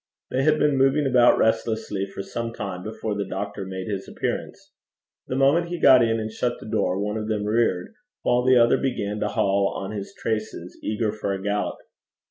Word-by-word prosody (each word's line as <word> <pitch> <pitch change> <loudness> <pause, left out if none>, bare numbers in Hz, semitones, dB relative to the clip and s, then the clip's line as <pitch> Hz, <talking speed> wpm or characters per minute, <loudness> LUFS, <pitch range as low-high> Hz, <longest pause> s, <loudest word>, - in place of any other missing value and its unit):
They 130 - +1
had 155 +2 +3
been 150 -2 +2
moving 135 +2 +3
about 125 -2 +5
restlessly 110 -3 0
for 100 0 -7
some 115 +3 -4
time 95 -5 -5
before 110 +1 -4
the 100 0 -2
doctor 100 0 -5
made 95 -1 -5
his 100 -2 -4
appearance. - - -4 0.6
The 130 - -3
moment 140 +6 +3
he 175 0 -4
got 130 -1 +7
in 115 -1 +2
and 110 0 -4
shut 120 +2 -1
the - - -11
door, 95 -3 0
one 105 +2 -2
of 110 0 -4
them 105 -2 -1
reared, 110 - 0 0.3
while 120 0 +2
the 130 0 +5
other 120 0 +5
began 105 -6 -2
to 105 - 0
haul 100 -1 +1
on 95 +1 -5
his 100 -2 -6
traces, 110 -6 -4
eager 110 0 -1
for 105 -2 -3
a 95 - -4
gallop. 105 0 -1
110 Hz, 200 wpm, -24 LUFS, 100-120 Hz, 0.6 s, got